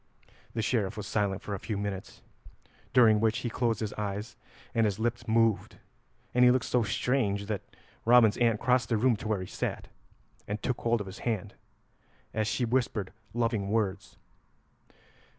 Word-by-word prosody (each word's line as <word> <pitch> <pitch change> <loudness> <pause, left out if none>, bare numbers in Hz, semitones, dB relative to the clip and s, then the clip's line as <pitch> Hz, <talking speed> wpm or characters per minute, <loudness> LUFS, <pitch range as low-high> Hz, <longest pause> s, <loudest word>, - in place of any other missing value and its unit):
The 115 - 0
Sheriff 110 -2 0
was 105 - -4
silent 100 -2 -1
for 105 - -4
a 100 - -3
few 105 0 -3
minutes, 100 -1 -5 0.7
during 115 -4 +6
which 110 0 +2
he 120 - -1
closed 115 -3 0
his 105 -2 -2
eyes 105 +1 -4 0.4
and 115 -1 +3
his 100 -2 -2
lips 120 +1 -2
moved, 115 -1 +2 0.6
and 125 - +4
he 125 - +8
looked 125 -1 +2
so 125 - +2
strange 110 -2 0
that 105 -2 -2 0.4
Robin's 115 -2 +6
aunt 115 -3 +3
crossed 125 0 +2
the 115 - +2
room 120 +2 +3
to 105 - -6
where 105 -3 0
he - - -4
sat, - - -4 0.6
and 105 +1 -3
took 125 - -1
hold 115 -1 +1
of - - -5
his 95 +1 -9
hand, 105 -4 -2 0.8
as 110 -1 0
she 120 +3 0
whispered 115 -5 -1 0.2
loving 115 -4 0
words. 105 -4 -1
110 Hz, 170 wpm, -29 LUFS, 100-120 Hz, 0.8 s, he